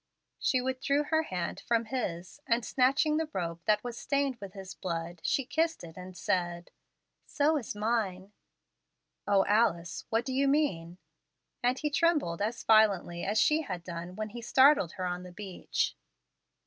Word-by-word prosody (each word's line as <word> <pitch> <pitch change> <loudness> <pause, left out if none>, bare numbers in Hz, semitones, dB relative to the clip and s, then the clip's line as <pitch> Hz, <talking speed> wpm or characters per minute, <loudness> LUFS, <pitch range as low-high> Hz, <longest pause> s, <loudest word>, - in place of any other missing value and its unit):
She 255 - +2
withdrew 260 +3 0
her 315 0 +4
hand 180 - -4
from 230 -1 0
his, 215 -2 -4
and, 230 0 +1
snatching 275 +4 +2
the 320 -1 -1
rope 170 -3 -3
that 210 -1 +2
was 240 -1 -5
stained 280 -2 0
with 200 -4 -9
his 190 -1 -8
blood, 170 -1 -4
she 275 - +1
kissed 320 - 0
it 165 -1 -10
and 185 0 -9
said, 175 -1 -1 0.6
"So 295 +2 +2
is 250 -8 -3
mine." 205 -3 -1 1.0
"O 200 -1 +4
Alice! 200 -6 +1
what 225 +2 +1
do 260 - -3
you 275 +2 +2
mean?" 180 - 0 0.6
and 245 +2 +2
he 300 +1 -2
trembled 295 - +1
as 220 +3 -2
violently 200 -6 +3
as 205 +3 0
she 305 +1 +4
had 185 - -5
done 170 +1 -6
when 215 +1 -4
he 235 +3 -8
startled 260 - +5
her 185 - -4
on 180 0 -2
the 180 0 -10
beach. 190 0 -3
215 Hz, 165 wpm, -30 LUFS, 180-265 Hz, 1.0 s, startled